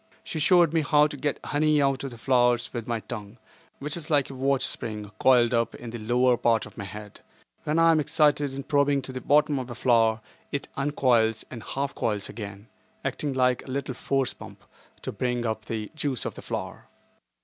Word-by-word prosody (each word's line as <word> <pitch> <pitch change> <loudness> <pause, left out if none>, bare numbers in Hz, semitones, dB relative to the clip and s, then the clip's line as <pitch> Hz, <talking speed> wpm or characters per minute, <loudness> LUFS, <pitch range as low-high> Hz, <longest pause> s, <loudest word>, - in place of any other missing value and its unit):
She 160 - -5
showed 170 0 +4
me 165 - +3
how 150 0 +4
to 150 0 -3
get 145 +1 -2
honey 150 +1 +2
out 135 -1 +1
of 135 - -3
the 120 - -10
flowers 120 -1 +2
with 120 -2 -5
my 115 -2 -2
tongue, 105 -1 -8 0.4
which 150 +1 -1
is 170 -2 -6
like 145 -3 +2
a - - -8
watch 135 0 +1
spring 105 -3 -4
coiled 125 -2 +5
up 115 -1 +1
in 120 -1 -8
the 120 - -6
lower 120 +3 +2
part 115 -1 +2
of - - -14
my 100 - -6
head. 105 +1 -10 0.4
When 150 +2 0
I 165 0 +6
am 160 - +3
excited 150 -2 +2
in 140 - -5
probing 140 -1 +2
to 130 - -7
the 130 0 -6
bottom 150 +1 +3
of 130 -1 -6
a 120 - -6
flower 115 -2 +3 0.3
it 140 - -3
uncoils 125 -6 +2
and 120 - -7
half 140 +4 -3
coils 105 -3 -2
again, 100 -1 -8 0.4
"acting 145 -2 -2
like 125 -1 +2
a - - -13
little 135 0 -3
force 135 +1 -1
pump" - - -12 0.4
to - - -3
bring 125 -1 -2
up 110 -1 -2
the 110 -2 -4
juice 145 -5 -1
of - - -3
the - - -9
flower. - - -6
130 Hz, 210 wpm, -26 LUFS, 115-145 Hz, 0.4 s, I